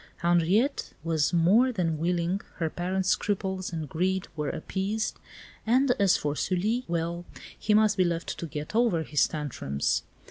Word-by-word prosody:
Henriette 175 Hz, -, +2 dB
was 160 Hz, -2 st, +1 dB
more 195 Hz, +10 st, +4 dB
than 165 Hz, -8 st, -1 dB
willing, 175 Hz, +3 st, 0 dB
her 160 Hz, -3 st, -2 dB
parents' 185 Hz, +1 st, -1 dB
scruples 190 Hz, -2 st, -1 dB
and 160 Hz, -3 st, -4 dB
greed 185 Hz, +5 st, -1 dB
were 150 Hz, -2 st, -2 dB
appeased, 200 Hz, +6 st, -2 dB, 0.4 s
and 255 Hz, +4 st, +3 dB
as 195 Hz, -2 st, +4 dB
for 145 Hz, 0 st, -2 dB
Sully 210 Hz, +10 st, 0 dB
well, 170 Hz, 0 st, -2 dB, 0.3 s
he 210 Hz, -1 st, +1 dB
must 215 Hz, -1 st, +4 dB
be 185 Hz, -, +5 dB
left 170 Hz, -1 st, -2 dB
to 170 Hz, -, -4 dB
get 150 Hz, +2 st, -6 dB
over 225 Hz, -9 st, +3 dB
his 150 Hz, -2 st, +2 dB
tantrums. 125 Hz, -, -2 dB
180 Hz, 150 wpm, -27 LUFS, 165-205 Hz, 0.4 s, be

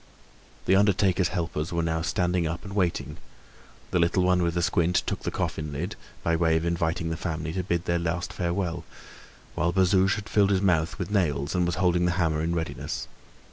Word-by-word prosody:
The 95 Hz, -, +4 dB
undertaker's 95 Hz, -2 st, +3 dB
helpers 85 Hz, -3 st, -3 dB
were 85 Hz, -1 st, 0 dB
now 80 Hz, 0 st, 0 dB
standing 90 Hz, -1 st, 0 dB
up 85 Hz, +2 st, -4 dB
and 100 Hz, -, -7 dB
waiting; 90 Hz, -4 st, -1 dB, 0.7 s
the -, -, +2 dB
little 85 Hz, +2 st, +2 dB
one 90 Hz, 0 st, +3 dB
with 85 Hz, -1 st, 0 dB
the 85 Hz, -, +1 dB
squint 85 Hz, +1 st, +1 dB
took -, -, -2 dB
the -, -, -3 dB
coffin 75 Hz, -1 st, -3 dB
lid, 75 Hz, +5 st, -4 dB, 0.3 s
by 85 Hz, -, +2 dB
way 80 Hz, -1 st, +3 dB
of 80 Hz, -, -2 dB
inviting 85 Hz, 0 st, -1 dB
the -, -, -1 dB
family 80 Hz, -3 st, -3 dB
to 95 Hz, -, -1 dB
bid 85 Hz, -1 st, -1 dB
their 85 Hz, 0 st, +1 dB
last 85 Hz, +1 st, -2 dB
farewell, 85 Hz, -1 st, -2 dB, 0.7 s
whilst 85 Hz, +1 st, 0 dB
Bazouge 95 Hz, 0 st, +4 dB
had 105 Hz, -1 st, -6 dB
filled 100 Hz, -2 st, +3 dB
his 100 Hz, -2 st, +3 dB
mouth 85 Hz, -4 st, +2 dB
with 90 Hz, 0 st, -4 dB
nails 75 Hz, -8 st, 0 dB
and 90 Hz, -2 st, +1 dB
was 85 Hz, -, -1 dB
holding 90 Hz, -1 st, +2 dB
the 90 Hz, -, +2 dB
hammer 80 Hz, -4 st, +1 dB
in 85 Hz, +2 st, -1 dB
readiness. 80 Hz, -2 st, -4 dB
85 Hz, 200 wpm, -26 LUFS, 80-90 Hz, 0.7 s, The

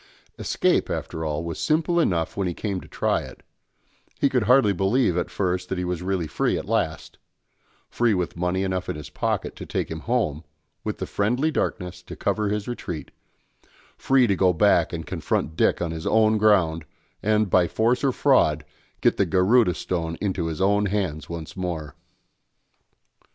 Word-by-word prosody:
Escape, -, -, +1 dB
after 80 Hz, -, -4 dB
all, 75 Hz, +1 st, -2 dB
was 85 Hz, -1 st, -5 dB
simple 165 Hz, +2 st, +1 dB
enough 85 Hz, -, 0 dB
when 100 Hz, -2 st, -1 dB
he 85 Hz, -, -3 dB
came 100 Hz, -4 st, -3 dB
to -, -, -13 dB
try -, -, 0 dB
it; -, -, -11 dB, 0.8 s
he 140 Hz, -, +3 dB
could 125 Hz, -5 st, +1 dB
hardly 125 Hz, -3 st, +5 dB
believe 95 Hz, +2 st, +2 dB
at 90 Hz, -, -1 dB
first 90 Hz, -1 st, -2 dB
that 95 Hz, -, -2 dB
he 90 Hz, -, -1 dB
really 90 Hz, 0 st, -2 dB
was 75 Hz, -, -11 dB
free -, -, +1 dB
at -, -, -5 dB
last; 80 Hz, -1 st, -2 dB, 0.7 s
free 120 Hz, -3 st, +1 dB
with 90 Hz, -2 st, -2 dB
money 90 Hz, +2 st, -1 dB
enough 95 Hz, -1 st, -2 dB
in -, -, -2 dB
his 75 Hz, -1 st, -9 dB
pocket -, -, -2 dB
to -, -, -8 dB
take -, -, -3 dB
him 80 Hz, -, -4 dB
home, 105 Hz, -, -1 dB, 0.4 s
with -, -, -3 dB
the -, -, -3 dB
friendly 125 Hz, +10 st, 0 dB
darkness 90 Hz, -, -3 dB
to -, -, -10 dB
cover 105 Hz, -1 st, 0 dB
his 105 Hz, 0 st, -2 dB
retreat; 90 Hz, -10 st, -5 dB, 0.8 s
free 135 Hz, -2 st, +3 dB
to 100 Hz, -4 st, +2 dB
go 95 Hz, 0 st, +3 dB
back 80 Hz, -, +3 dB
and -, -, -5 dB
confront 80 Hz, -, -2 dB
Dick -, -, +2 dB
on 85 Hz, -, -2 dB
his 80 Hz, 0 st, -5 dB
own 110 Hz, -1 st, +3 dB
ground, 90 Hz, -7 st, +3 dB, 0.4 s
and, 110 Hz, 0 st, +2 dB
by 90 Hz, -2 st, +4 dB
force, 115 Hz, -, +1 dB
or 135 Hz, -, +3 dB
fraud, 80 Hz, -, +3 dB, 0.4 s
get -, -, +3 dB
the -, -, +2 dB
Garudâ 95 Hz, 0 st, +3 dB
Stone 80 Hz, -2 st, -3 dB
into 95 Hz, -5 st, -1 dB
his 80 Hz, 0 st, -4 dB
own 100 Hz, +2 st, +2 dB
hands 90 Hz, -7 st, -2 dB
once 80 Hz, -3 st, -7 dB
more. 80 Hz, -6 st, -4 dB
95 Hz, 180 wpm, -24 LUFS, 85-110 Hz, 0.8 s, hardly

